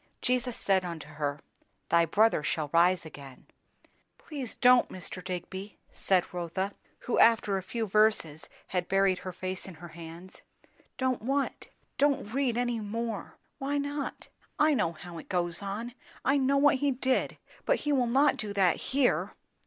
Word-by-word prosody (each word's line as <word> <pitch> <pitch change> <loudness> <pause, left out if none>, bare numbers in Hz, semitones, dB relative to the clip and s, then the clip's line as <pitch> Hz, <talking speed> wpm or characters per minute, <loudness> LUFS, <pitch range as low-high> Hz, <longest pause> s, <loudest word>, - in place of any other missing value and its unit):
"'Jesus 250 -1 0
said 190 -2 +2
unto 170 -4 -6
her, 150 -1 -3 0.5
Thy 170 0 +5
brother 210 +2 +3
shall 150 0 -2
rise 175 +1 +4
again.' 140 -4 -11 0.4
" - - -40
"Please 275 -7 -6
don't, 250 0 +5
Mr. 185 0 -6
Digby!" 190 +2 -6
said 185 -2 +1
Rotha, 180 +3 -3 0.3
who 245 - 0
after 225 -3 +5
a 190 - -1
few 225 +5 -3
verses 210 -7 +2 0.2
had 180 -1 -1
buried 195 -1 +2
her 185 - -6
face 185 +1 -5
in 190 - -9
her 170 +2 -11
hands. 170 +3 -11 0.6
"Don't 260 -3 0
what?" 275 +4 -1 0.3
"Don't 275 -6 +1
read 260 -3 +1
any 240 -1 0
more." 220 0 -4 0.2
"Why 280 +2 -1
not?" 285 0 -4 0.3
"I 305 0 +4
know 210 - +1
how 170 +1 -9
it - - -13
goes 175 -1 0
on. 210 +5 -5 0.3
I 275 - +4
know 275 +1 +2
what 280 -1 +5
he 285 +2 +1
did. 260 0 0 0.3
But - - +2
he 295 - 0
will 255 -3 +2
not 275 +4 +3
do 210 -2 -4
that 190 -3 +3
here." 265 -1 +1
205 Hz, 165 wpm, -29 LUFS, 175-255 Hz, 0.6 s, Thy